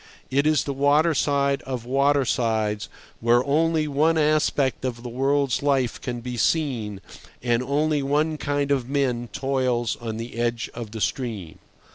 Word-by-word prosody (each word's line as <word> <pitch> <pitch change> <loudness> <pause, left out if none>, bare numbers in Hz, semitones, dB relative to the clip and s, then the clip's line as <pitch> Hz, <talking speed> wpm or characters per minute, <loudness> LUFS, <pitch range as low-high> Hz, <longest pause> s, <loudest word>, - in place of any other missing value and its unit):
It 140 +3 +2
is 155 -4 +3
the 140 - -3
waterside 140 -1 +2
of 125 -3 -5
watersides, 120 -6 +1 0.3
where 120 +2 +3
only 155 +2 +2
one 155 +3 +2
aspect 150 -4 +1
of 120 -2 -3
the 125 - -5
world's 135 +2 +1
life 135 -4 0
can 120 -2 -4
be 125 0 -5
seen, 115 -9 0 0.4
and 120 -1 +2
only 145 +3 +1
one 150 +3 0
kind 145 -1 -1
of 130 -3 0
men 125 -4 0
toils 130 -3 0
on 110 -2 -4
the 115 +1 -7
edge 120 -1 -1
of 115 -2 -6
the 110 0 -7
stream. 110 -12 -3
135 Hz, 150 wpm, -24 LUFS, 120-145 Hz, 0.4 s, is